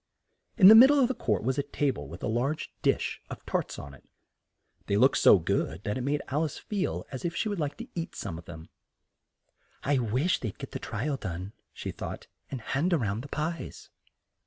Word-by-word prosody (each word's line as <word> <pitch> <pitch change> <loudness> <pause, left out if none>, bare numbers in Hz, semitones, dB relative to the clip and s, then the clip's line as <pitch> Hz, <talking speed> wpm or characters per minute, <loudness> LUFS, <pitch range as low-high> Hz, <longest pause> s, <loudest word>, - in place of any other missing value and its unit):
In 190 -5 +9
the 215 - +12
mid 235 +4 +10
dle 290 +1 +4
of 255 -2 +4
the - - +1
court 105 - -1
was 130 +4 0
a - - +4
ta 140 0 0
ble 70 - -8
with 85 +6 -10
a - - 0
large 130 +7 -1
dish - - 0
of - - -9
tarts - - -2
on 70 0 -8
it. 70 - -16 0.8
They 100 - +1
looked 130 +5 +4
so - - +8
good 90 0 -1
that 105 - -2
it 130 - -3
made 145 +3 -1
Al 145 +4 +1
ice 155 - -3
feel 205 -4 -3
as 130 - -6
if 170 -1 -2
she 220 - 0
would 205 -3 -3
like 145 -2 -2
to - - -7
eat 170 -1 -5
some 80 - -5
of 85 - -14
them. 80 -1 -10 1.1
"I 140 -1 +2
wish 125 - +1
they'd 110 -5 -5
get - - -8
the - - -4
tri 115 - -4
al 145 -2 0
done," 95 -1 -6 0.2
she - - -6
thought, - - -7 0.2
"and 130 -3 -5
hand 150 +10 0
round 110 -8 0
the - - -8
pies!" 155 - -5
135 Hz, 225 wpm, -28 LUFS, 100-160 Hz, 1.1 s, the